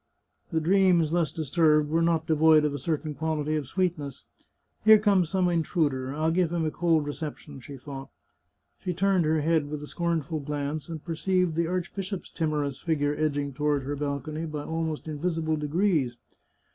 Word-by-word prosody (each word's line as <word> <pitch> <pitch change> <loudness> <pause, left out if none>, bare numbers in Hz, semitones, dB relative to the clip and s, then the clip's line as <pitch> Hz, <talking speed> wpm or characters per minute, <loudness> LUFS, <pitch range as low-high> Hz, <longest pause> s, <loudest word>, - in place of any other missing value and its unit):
The 165 - +1
dreams 175 -2 +3
thus 170 -4 +1
dis 155 -4 -5
turbed 155 -3 +4
were 165 +1 +2
not 165 -1 +2
devoid 155 -1 +5
of 150 - 0
a 145 - -4
certain 155 +2 -2
quality 155 0 -1
of 150 -4 -2
sweetness. 165 -5 -2 0.3
" - - -46
Here 220 0 +9
comes 200 -5 +2
some 185 -1 +1
intruder. 155 -6 0
I'll 155 +3 0
give 175 -1 +1
him 170 -2 0
a 155 - 0
cold 165 -3 +2
recep 145 +1 -5
tion," 145 -3 -12
she 140 +2 -10
thought. 135 0 -8 0.7
She 180 -2 -3
turned 190 -2 +2
her 155 0 +2
head 155 -1 +1
with 150 0 -5
a - - -7
scornful 165 -2 -2
glance, 145 +1 -4
and 160 -3 -7
perceived 180 +1 0
the 165 +1 0
archbishop's 185 +2 -4
timorous 150 -4 -1
figure 145 -3 0
edg 155 -2 0
ing 140 -1 -2
toward 145 0 0
her 145 +2 -3
balcony 145 +3 -3
by 150 -1 -5
almost 160 -1 -3
invisible 160 +1 -1
degrees. 150 -4 0
155 Hz, 185 wpm, -27 LUFS, 145-170 Hz, 0.7 s, Here